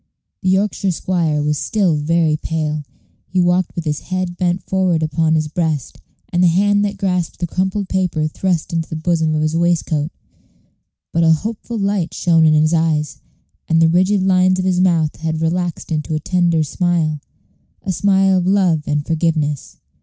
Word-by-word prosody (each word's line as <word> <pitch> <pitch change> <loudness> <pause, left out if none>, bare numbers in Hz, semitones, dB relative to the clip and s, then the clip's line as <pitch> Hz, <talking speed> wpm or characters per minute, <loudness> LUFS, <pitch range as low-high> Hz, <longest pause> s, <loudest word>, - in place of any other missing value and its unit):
The 185 - 0
Yorkshire 195 +1 +1
squire 165 -4 0
was 150 -1 0
still 195 -7 +1
very 155 +1 +1
pale. 155 -1 -3 0.4
He 185 - -1
walked 175 0 +1
with 170 - -3
his 150 -1 -1
head 185 -1 -3
bent 175 0 -1
forward 185 -4 0
upon 160 +1 +1
his 155 -1 0
breast, 155 -4 -2 0.3
and 175 - +2
the 180 - +5
hand 205 +4 +2
that 205 -1 -2
grasped 180 -3 -1
the 175 - -2
crumpled 190 +3 -2
paper 180 -5 0
thrust 175 +1 -2
into 165 -1 -2
the - - -5
bosom 160 -1 0
of 155 - 0
his 155 +1 0
waistcoat; 165 -3 0 1.0
but 170 - +2
a 165 - +5
hopeful 220 +6 -4
light 200 -4 -1
shone 165 -2 +3
in 155 - +4
his 155 +2 +3
eyes, 160 -2 0 0.5
and 165 - +3
the 165 0 +5
rigid 185 +3 +2
lines 185 0 +3
of 185 - -1
his 185 -1 +1
mouth 170 -4 +2
had 160 0 -3
relaxed 170 +1 -2
into 155 0 -2
a - - -1
tender 170 -1 +1
smile 160 -1 0 0.6
a 195 - -2
smile 190 0 +3
of 180 - -2
love 185 -5 +2
and 150 0 -1
forgiveness. 155 -3 -1
170 Hz, 175 wpm, -18 LUFS, 155-185 Hz, 1.0 s, the